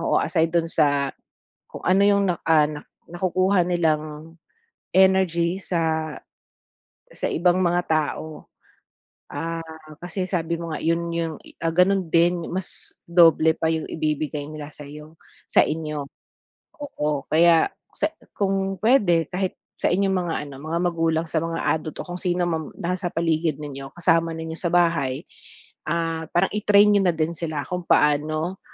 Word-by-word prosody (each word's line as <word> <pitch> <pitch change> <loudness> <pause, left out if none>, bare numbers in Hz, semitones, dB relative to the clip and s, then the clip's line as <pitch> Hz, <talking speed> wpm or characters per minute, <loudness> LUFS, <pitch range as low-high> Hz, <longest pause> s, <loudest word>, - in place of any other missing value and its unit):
oo, 165 - +1
aside 165 -2 +1
do'n 165 -1 +2
sa 145 -4 +2 0.6
kung - - -9
ano 185 +2 +4
yung 200 -1 +4
na, - - -2
ah, 155 -2 +5 0.4
nakukuha 185 +1 +2
nilang 155 -2 -1 0.6
energy 185 -2 +3
sa, 160 -3 -1 1.0
sa - - -3
ibang 180 +2 +2
mga 175 0 +2
tao. 155 0 -2 0.8
Ah, 165 0 -4 0.4
kasi 185 +1 -3
sabi 170 -3 -2
mo 170 - -5
nga - - -3
'yun 170 +1 0
yung 165 -2 -2 0.3
ah, 165 0 0
gano'n 185 0 +3
din 170 +1 +2
mas 185 0 -5
doble 165 -2 +5
pa 160 - 0
yung 160 -1 -2
ibibigay 150 -1 -2
nila 150 -1 -8
sa'yo, 150 +2 -11 0.4
sa - - +6
inyo, 150 -2 -3 0.8
oo 150 - -2
kaya 165 +1 +5 0.2
sa - - 0 0.3
kung 195 -1 -1
puwede 200 -9 +3
kahit 185 0 -1 0.3
sa - - +2
inyong 195 +1 +2
mga 175 -2 -1
ano, 140 - -10
mga 165 +2 -1
magulang 165 -2 0
sa 160 - 0
mga 165 0 -3 0.2
adult 155 -1 -7
o - - -17
kung 175 - -4
sino 175 0 0
mga 160 -3 -2
nasa 180 +1 -2
paligid 160 -2 0
ninyo 135 -1 -7
kasama 165 -1 +2
ninyo 160 0 -5
sa 170 - -1
bahay, 165 -7 +1 0.6
ah, 165 -1 -1
parang 175 +2 +2
i-train 205 0 +5
niyo 205 - +4
na 175 - +4
din 160 +1 -1
sila 155 -4 -3
kung 180 -1 -3
paano 155 +5 +2
165 Hz, 150 wpm, -23 LUFS, 155-180 Hz, 1.0 s, sa